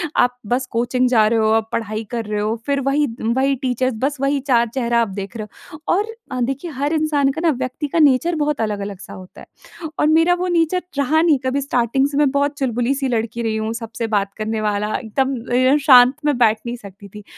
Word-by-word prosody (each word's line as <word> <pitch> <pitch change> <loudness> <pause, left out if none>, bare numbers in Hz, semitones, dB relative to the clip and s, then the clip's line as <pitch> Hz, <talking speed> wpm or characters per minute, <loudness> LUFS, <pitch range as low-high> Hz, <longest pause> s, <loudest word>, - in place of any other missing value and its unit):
आप 245 0 +2 0.2
बस 260 +1 -2
कोचिंग 250 +2 +1
जा 220 -4 +4
रहे 225 +1 +1
हो 220 0 +2
आप 220 - -19
पढ़ाई 215 -1 -3
कर 230 -2 -3
रहे 210 0 -3
हो 215 +2 -1
फ़िर 280 -1 0
वही 295 +2 +2 0.2
वही 265 +4 +1
टीचर्स 255 +1 0
बस 285 +1 0
वही 275 +1 +1
4 235 -2 +3
चेहरा 235 -3 +1
आप 230 - +1
देख 195 +3 -7
रहे 215 -1 -6 0.3
हो। 305 - -9 0.2
और 405 +3 +1 0.3
अ, 255 - -3
देखिए 270 +7 -3
हर 285 +2 -2
इंसान 305 -3 +1
का 315 +4 -5
ना 335 - +3
व्यक्ति 255 +4 -4
का 330 - -1
नेचर 300 +4 +3
बहुत 295 -4 -1
अलग-अलग 200 -2 -3
सा - - -11
होता 185 -1 -12
है 335 -2 -12
और - - +3
मेरा 325 +3 +4
वो 365 +1 -2
नेचर 345 +1 +1 0.2
रहा 300 +3 +2
नहीं 325 -4 +4
कभी 270 +2 0
स्टार्टिंग 265 0 +1
से 285 0 -4
मैं 295 -1 +4
बहुत 285 +1 0
चुलबुली 245 -1 0
सी 275 -1 -2
लड़की 235 -1 -2
रही 225 -1 -1
हूँ 220 +1 -2
सबसे 230 0 -5
बात 200 -1 -1
करने 215 0 -2
वाला 210 0 -1
एकदम 265 +4 -1 0.4
अ, - - +4
शांत 255 -1 +7
मैं 290 -4 +2
बैठ 225 -3 +3
नहीं 240 0 -3
सकती 200 -2 -13
थी 210 +1 -11
255 Hz, 230 wpm, -19 LUFS, 225-285 Hz, 0.4 s, शांत